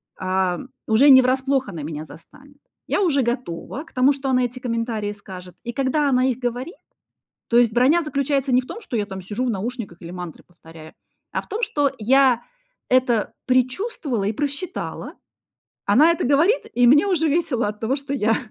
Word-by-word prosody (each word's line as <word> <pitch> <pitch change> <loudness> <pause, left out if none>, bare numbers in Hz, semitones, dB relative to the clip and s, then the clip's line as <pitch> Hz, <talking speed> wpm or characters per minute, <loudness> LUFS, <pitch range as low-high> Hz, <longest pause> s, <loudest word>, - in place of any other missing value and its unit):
ам, 185 +4 -1 0.2
уже 240 +6 +5
не 260 -1 +9
врасплох 265 0 0
она 165 -6 -6
меня 155 0 -6
застанет. 275 - -16 0.3
Я - - 0
уже 300 -8 +2
готова 240 - -4
к 330 - -21
тому, 260 +3 +4
что 270 0 -4
она 255 -1 +2
эти 245 +1 -6
комментарии 230 -3 -2
скажет, 185 -3 -11
и - - -1
когда 275 +3 +1
она 255 -1 +2
их 250 - 0
говорит 245 - -3 0.7
То 235 - +1
есть 240 -2 +4
броня 280 +8 +4
заключается 280 -2 -1
не 250 - +5
в 255 - -14
том, 445 - -8
что 250 - -4
я 210 -2 -1
там 190 -2 -7
сижу 210 +7 -3
в - - +1
наушниках 215 -4 -5
или 170 - -8
мантры 180 -3 -8
повторяю, 165 -2 -14 0.4
а - - -1
в - - -21
том, 445 - -4
что 290 - +1
я 250 +1 +3 0.5
это 250 -4 +2 0.2
предчувствовала 255 - 0
и 210 - 0
просчитала. 290 - -4 0.7
Она 275 +11 +5
это 335 - -2
говорит, 335 - +3 0.2
и 245 - +6
мне 290 +10 +6
уже 325 -5 +1
весело 280 -7 0
от 210 0 -7
того, 235 +5 0
что 280 0 -5
я 225 -4 +2
250 Hz, 190 wpm, -22 LUFS, 210-280 Hz, 0.7 s, не